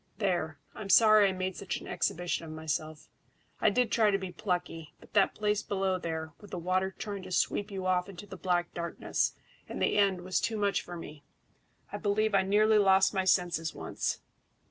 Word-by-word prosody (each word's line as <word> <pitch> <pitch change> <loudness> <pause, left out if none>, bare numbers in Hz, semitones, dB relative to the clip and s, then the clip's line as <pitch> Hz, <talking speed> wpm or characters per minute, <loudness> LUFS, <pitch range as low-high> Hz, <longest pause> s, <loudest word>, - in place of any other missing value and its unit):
There, 175 -7 -1 0.2
I'm 205 -2 -8
sorry 215 -2 +7
I - - 0
made 185 0 -3
such 200 - -4
an - - -11
exhibition 175 -1 -1
of 165 - -8
myself. 155 0 -4 0.5
I - - +4
did 245 -2 +1
try 220 -2 +4
to 195 - +2
be 190 -2 -6
plucky; 175 -4 -4
but - - -19
that 200 -2 +3
place 210 -1 0
below 190 -2 -1
there, 160 -2 -4
with 205 - -13
the 185 - -5
water 185 +2 -1
trying 200 -2 -5
to 185 0 -10
sweep 205 +3 0
you 190 -2 -5
off 180 0 +1
into 195 +1 -9
the 195 - -9
black 175 -1 -1
darkness 170 0 -2 0.3
and - - -5
the - - +2
end, 195 -3 +2
was 185 -1 -1
too 225 - -1
much 200 -2 +1
for 175 0 -8
me. 150 -3 -10 0.7
I 205 - -4
believe 215 +1 +1
I 195 - +5
nearly 210 +3 +4
lost 190 -1 +4
my 190 -2 0
senses 175 -3 +1
once. - - -3
190 Hz, 200 wpm, -30 LUFS, 175-205 Hz, 0.7 s, sorry